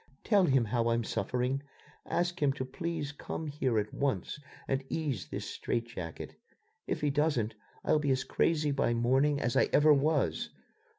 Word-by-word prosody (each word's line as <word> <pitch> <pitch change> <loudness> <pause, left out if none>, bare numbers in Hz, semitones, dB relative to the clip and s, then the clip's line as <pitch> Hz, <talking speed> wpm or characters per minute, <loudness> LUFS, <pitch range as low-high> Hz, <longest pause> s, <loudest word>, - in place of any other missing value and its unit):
"Tell 200 -4 +4
him 135 -6 +3
how 115 +1 0
I'm 115 0 +2
suffering. 125 +4 -1 0.5
Ask 175 0 -1
him 140 -2 +3
to 130 - -4
please 160 +1 -3
come 155 +2 -5
here 140 -6 0
at 105 0 -1
once 135 - -1 0.3
and 135 0 0
ease 140 - -2
this - - -5
strait 120 -1 -2
jacket. 90 -9 -7 0.5
If - - -2
he 145 -1 +2
doesn't, 145 -7 +1 0.3
I'll 155 - +4
be 145 -1 -1
as 130 0 +2
crazy 155 -3 +1
by 135 -4 +1
morning 135 +5 +3
as 120 -4 -1
I - - +4
ever 150 +1 +6
was. 145 +1 +1
135 Hz, 170 wpm, -31 LUFS, 120-150 Hz, 0.5 s, ever